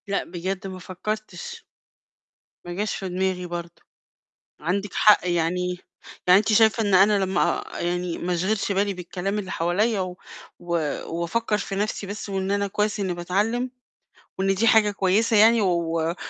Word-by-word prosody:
لأ، 200 0 0
بجد 185 +2 -4
ما 185 -1 -7
فكّرتش. 215 - -6 1.0
ما 175 - -5
جاش 205 +4 -2
في 190 - -5
دماغي 185 0 -1
برضه. 170 -1 -7 0.8
عندِك 190 +5 -2
حق، 210 -3 +5
يعني 180 +1 0 0.5
يعني 180 +1 +7
أنتِ 215 +1 0
شايفة 220 +1 +4
إن 200 -2 +1
أنا 200 +1 +5
لمّا 190 -1 0 0.4
آآ - - -5
يعني 175 0 -2
ما 180 0 -1
أشغِلش 200 +4 0
بالي 200 +1 0
بالكلام 180 +3 -4
اللي 190 -3 -5
حواليّا 195 +6 +1
و 180 -1 -4 0.4
و 175 -1 -4 0.5
وأفكّر 210 +5 0
في 195 - -4
نَفْسي 205 0 -2
بس 205 +2 -6
وإن 195 -1 -2
أنا 200 0 +1
كويس 210 +1 -1
إنّي 190 -3 -1
باتعلِّم، 210 +8 -1 0.7
وإن 195 0 +1
دي 225 +4 +2
حاجة 220 -3 +5
كويسة 205 +3 +2
يعني 225 +2 +6
و 170 -3 0
195 Hz, 160 wpm, -24 LUFS, 180-210 Hz, 1.0 s, يعني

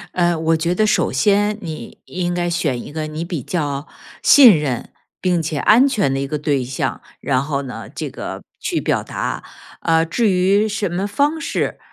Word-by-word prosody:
呃， 175 -1 +3
我 160 0 +2
觉 170 +2 0
得 215 +4 +2
首 - - +2
先 205 +9 +2
你 160 -5 -8
应 175 -1 -2
该 175 0 -1
选 150 -8 -1
一 - - -9
个， 155 -1 -3
你 155 +2 -5
比 170 -6 -4
较 145 -3 -2 0.4
信 245 - +8
任 135 -5 -3 0.3
并 180 -2 +1
且 155 -1 -2
安 225 - +5
全 205 - +1
的 135 - -1
一 - - -1
个 150 +2 -3
对 145 -3 0
象， 125 +1 -3 0.2
然 130 -1 0
后 140 -1 -2
呢， 130 -2 -8
这 - - -4
个 - - -7 0.2
去 - - -1
表 - - 0
达。 - - -4 0.4
呃， 165 0 +3
至 220 +6 +1
于 195 +4 +3
什 210 -1 -1
么 180 +3 -2
方 285 +10 0
式， - - -2
170 Hz, 205 characters per minute, -19 LUFS, 145-200 Hz, 0.4 s, 信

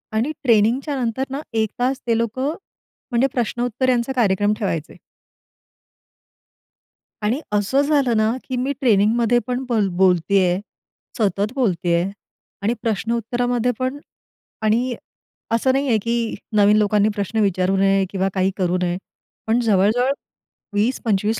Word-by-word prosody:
आणि 245 +8 +1
ट्रेनिंगच्या 240 +5 +2
नंतरना 265 +4 -2
1 220 -1 +1
तास 255 +2 0
ते 230 -1 +2
लोकं 235 +4 -1 0.6
म्हणजे 240 +3 +3
प्रश्नोत्तर 245 +1 -1
यांचा 245 +1 +1
कार्यक्रम 205 -2 +2
ठेवायचे. 165 -7 -3 2.3
आणि 230 +7 +1
असं 210 +7 +2
झालं 280 -5 +2
ना, 215 +1 +3
की 260 - -4
मी 260 +3 -1
ट्रेनिंगमध्ये 230 +1 +3
पण 250 0 -1
बोल 215 -4 +2
बोलतेय, 185 0 +3 0.6
सतत 205 +1 0
बोलतेय 175 - +1 0.6
आणि 215 +4 +1
प्रश्नोत्तरामध्ये 235 +3 0
पण. 255 +2 -1 0.6
आणि 235 +3 +1 0.6
असं 230 +3 +2
नाही 275 +1 0
आहे, 230 - +3
की 230 +1 -1 0.2
नवीन 210 0 +5
लोकांनी 210 0 +3
प्रश्न 205 +2 -2
विचारू 190 -1 +1
नये 195 0 +3
किंवा 195 0 -1
काही 190 0 +1
करू 180 -2 +1
नये. 175 0 0 0.5
पण 225 +2 +3
जवळ-जवळ 225 +4 +2 0.6
20-25 215 -1 0
225 Hz, 125 wpm, -21 LUFS, 200-245 Hz, 2.3 s, नवीन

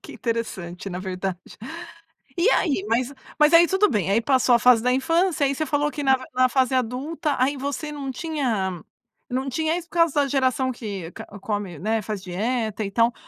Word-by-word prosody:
Que - - -10
interessante 195 -6 -4
na 180 - -4
verdade. 185 -1 -4 1.0
E 350 +7 +4
aí 280 - +1
Mas 245 +4 0 0.3
mas 300 +2 +5
aí 340 +1 +8
tudo 385 +3 +3
bem, 205 -6 0
aí 210 +4 +3
passou 255 -1 +3
a - - +3
fase 245 -1 +5
da 250 +2 +2
infância, 330 +3 +2
aí 275 - +1
você 310 +3 -2
falou 295 0 0
que 295 - -5
na 265 -1 +4 0.2
na 255 0 +3
fase 260 +1 +1
adulta 260 +5 -1
aí 275 +3 +2
você 285 +3 -4
não 285 -2 -5
tinha 240 - -2 0.5
não 260 +2 -2
tinha 315 +5 0
isso 350 -1 -7
por - - -16
causa 335 -3 +3
da 280 - +1
geração 260 -1 +1
que 200 -8 -6
ca - - -9
come, 200 -6 -4
né, 220 +3 0
faz 210 -1 -5
dieta 215 +4 -2
e 200 - -4
tal. 230 +3 +3
255 Hz, 200 wpm, -24 LUFS, 215-290 Hz, 1.0 s, aí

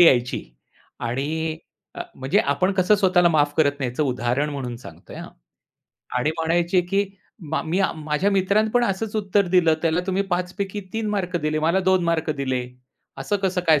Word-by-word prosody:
यायची 125 -7 +4 0.6
आणि 155 +6 -2 0.4
अ, - - -2
म्हणजे 135 +9 0
आपण 190 -2 +1
कसं 185 +3 +4
स्वतःला 185 -3 +4
माफ 145 -3 +2
करत 145 -3 +4
नाही. 130 -2 -1
याचं 125 +5 -1
उदाहरण 130 +2 0
म्हणून 130 -4 -4
सांगतोय, 120 - -12
हां. - - -8 0.9
आणि 150 +5 +1
म्हणायचे 170 +3 +2
की, 200 +1 +2 0.5
"मा 160 - 0
मी 165 +4 -1
अ, 195 - +2
माझ्या 155 +5 0
मित्रानं 200 +3 +2
पण 245 +1 +3
असचं 210 +2 -2
उत्तर 200 -1 +1
दिलं, 165 -3 +5
त्याला 165 +1 +2
तुम्ही 190 +1 +1
5 180 0 -1
पैकी 200 +1 -3
3 225 -1 -2
मार्क 185 -4 -1
दिले. 155 -1 -1
मला 165 +5 +2
2 185 -2 +3
मार्क 165 -2 0
दिले, 130 -4 -2 0.6
असं 205 +9 0
कसं 185 -1 +1
काय 155 -2 +6
170 Hz, 180 wpm, -23 LUFS, 150-190 Hz, 0.9 s, काय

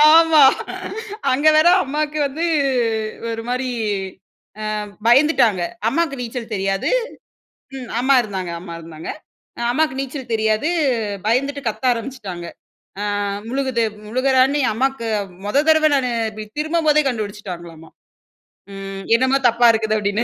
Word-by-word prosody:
ஆமா. 325 -2 +6 0.9
அங்க 285 +4 +2
வேற 310 +2 +5 0.2
அம்மாவுக்கு 300 +2 -2
வந்து 310 +5 -3 0.8
ஒரு 225 0 -3
மாரி 255 +1 -1 1.2
அ - - -5 0.2
பயந்துட்டாங்க. 240 - +4 0.3
அம்மாக்கு 320 +2 0
நீச்சல் 235 -1 -5
தெரியாது. 195 0 -1 0.9
ம். 255 -2 -7
அம்மா 270 +2 +3
இருந்தாங்க 190 -5 -5
அம்மா 170 -1 -8
இருந்தாங்க. 160 -1 -9 0.6
அம்மாக்கு 305 +2 +1
நீச்சல் 270 -2 -6
தெரியாது. 220 +4 +1 0.6
பயந்துட்டு 275 +5 0
கத்த 225 - -6
ஆரம்பிச்சுட்டாங்க. 225 -8 -6 0.8
அ - - -1 0.2
முழுகுது 260 -2 0 0.2
முழுகுறேன்னு 260 +4 +2
ஏன் 235 - +2
அம்மாக்கு 260 0 -1 0.4
மொத 275 +8 +2
தடவ 315 -1 +5
நானு 255 -2 0 0.2
இப்டி 215 0 -8
திரும்பும்போதே 310 -1 +2
கண்டுபிடிச்சுட்டாங்களாமா. 185 -8 -6 0.9
ம். 195 0 -7
"என்னமோ 260 +2 +2
தப்பா 235 +1 +4
இருக்குது" 220 -1 0
அப்படின்னு. 205 +2 0
245 Hz, 115 wpm, -20 LUFS, 215-275 Hz, 1.2 s, ஆமா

